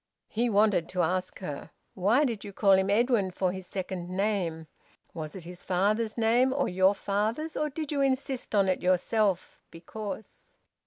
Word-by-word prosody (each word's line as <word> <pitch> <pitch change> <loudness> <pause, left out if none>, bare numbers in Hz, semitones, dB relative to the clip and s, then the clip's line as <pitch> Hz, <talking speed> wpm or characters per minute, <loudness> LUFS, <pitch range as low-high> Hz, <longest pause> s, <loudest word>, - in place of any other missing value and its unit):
He 235 +2 0
wanted 205 -5 +3
to 180 -1 0
ask 185 +3 -1
her, 145 -6 -6 0.2
"Why 215 +10 +3
did 230 -6 -3
you 205 - -7
call 200 0 +3
him 190 0 +4
Edwin 220 -2 +2
for 185 0 -1
his 190 -1 -8
second 185 -2 -5
name? 185 -4 -1 0.5
Was 155 0 -6
it 185 - -7
his 175 +1 -9
father's 210 +5 0
name, 235 +3 +3
or 275 +1 0
your 190 +2 +3
father's, 220 +11 -2
or 300 - 0
did 305 +1 -5
you 285 -2 0
insist 265 -3 -1
on 200 -1 +4
it 185 - 0
yourself, 185 +1 +1
because 205 +5 -8
200 Hz, 170 wpm, -28 LUFS, 185-230 Hz, 0.5 s, him